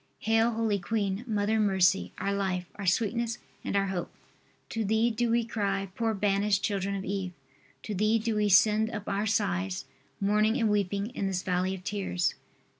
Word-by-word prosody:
Hail 225 +2 +3
holy 220 -2 0
queen, 200 0 -1
Mother 215 0 +1
of - - +3
Mercy, 190 -2 +3
our 200 - -1
life, 190 -2 -1
our 200 -2 -6
sweetness 230 +5 +1 0.3
and - - -3
our 200 0 +3
hope. 180 -2 -3 0.6
To 225 - -2
thee 220 +3 +2
do 235 +1 0
we 235 0 +2
cry, 195 -4 -2
poor 225 0 0
banished 200 0 +1
children 200 -1 -1
of 190 - -4
Eve. 190 -1 -3 0.5
To 215 - -4
thee 215 +3 +2
do 220 0 -1
we 210 -1 +2
send 215 +3 +5
up 210 -3 -6
our 200 +2 0
sighs, 90 - 0 0.3
mourning 210 +3 +2
and 225 -4 +2
weeping 200 +1 0
in 200 -5 -2
this 185 -1 -2
valley 185 +1 0
of 185 - -11
tears. 190 -2 -1
205 Hz, 185 wpm, -29 LUFS, 195-220 Hz, 0.6 s, send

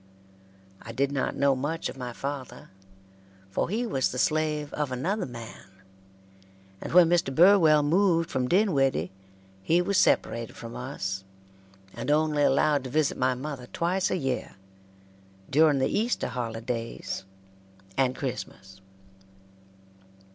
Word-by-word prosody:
I 115 - -9
did 140 +3 0
not 135 -2 -1
know 140 -1 +3
much 145 +6 -2
of - - -7
my 125 -2 -6
father, 135 +1 -6 0.8
for 95 - -1
he 225 +5 -1
was 135 - 0
the 125 - -5
slave 155 +1 0
of 150 -3 -2
another 180 - -2
man, 115 -2 -9 1.2
and - - -6
when 175 -1 +7
Mr. 175 -4 +2
Burwell 165 -4 +6
moved 165 +1 +2
from 125 -1 0
Dinwiddie 135 - +2 0.5
he 165 - +2
was 185 +2 +1
separated 115 -1 +1
from 115 0 -9
us, 95 -7 -4 0.7
and - - -5
only 150 0 +2
allowed 145 0 +3
to - - -5
visit 150 +2 +1
my 130 0 +1
mother 130 -1 -6
twice 180 +6 0
a - - 0
year 135 -6 -3 1.0
during 150 +1 +5
the 130 - 0
Easter 230 +3 0
holidays 115 -2 -4 0.7
and 130 -1 +1
Christmas. 95 -7 -6
140 Hz, 130 wpm, -27 LUFS, 125-165 Hz, 1.2 s, when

